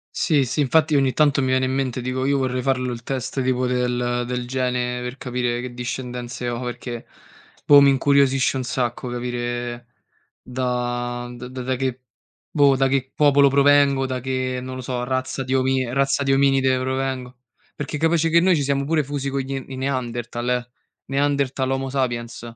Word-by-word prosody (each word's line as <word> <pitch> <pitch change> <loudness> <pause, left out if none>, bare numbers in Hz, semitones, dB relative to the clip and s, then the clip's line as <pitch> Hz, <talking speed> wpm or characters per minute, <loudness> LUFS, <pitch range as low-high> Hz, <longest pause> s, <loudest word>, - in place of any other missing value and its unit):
Sì, 145 -5 +2
sì, 130 - -3
infatti 155 +3 +3
ogni 135 -2 +3
tanto 145 -2 +3
mi 130 - 0
viene 130 0 +2
in 130 - -1
mente, 130 -2 -1
dico: 130 +1 -2
"Io 140 0 +2
vorrei 130 -1 -1
farlo 130 -2 0
il 115 - -7
test 130 +1 -3
tipo 130 0 0
del 125 -1 0
del 125 -1 -3
gene 125 -1 -1
per 125 +2 -5
capire 125 -1 -2
che 125 0 -6
discendenze 125 0 -5
ho, 120 +1 -3
perché, 120 -1 -6 0.6
boh, 145 -1 +8
mi 140 - +6
incuriosisce 135 -1 +3
un 130 - -2
sacco 125 0 -2
capire 120 0 -4 0.5
da 120 -1 -3
d 125 0 -8
da 130 0 -3
che 130 -1 -2 0.5
boh, 140 -2 +4
da 135 0 +2
che 135 -1 -1
popolo 140 -1 +5
provengo, 140 -1 +4
da 130 -1 -3
che, 130 0 -2
non 130 0 -6
lo - - -5
so, 125 -1 -3
razza 130 +1 -2
di 130 - -4
omie 130 -2 +1
razza 140 +1 +1
di 135 0 +1
ominide 135 -1 +3
provengo. 130 -1 -3 0.4
Perché 145 +1 -4
capace 165 0 +2
che 170 +1 +5
noi 180 -1 +4
ci 145 - 0
siamo 140 0 0
pure 155 -2 +1
fusi 140 0 -3
con 135 0 -1
gli 135 +1 -4
n 130 - -10
i 130 - -7
Neanderthal, 120 -2 -3
eh, 125 -1 -1 0.3
Neanderthal, 140 -1 0
Homo 135 0 -1
sapiens. 120 -4 -2
130 Hz, 185 wpm, -22 LUFS, 125-135 Hz, 0.6 s, boh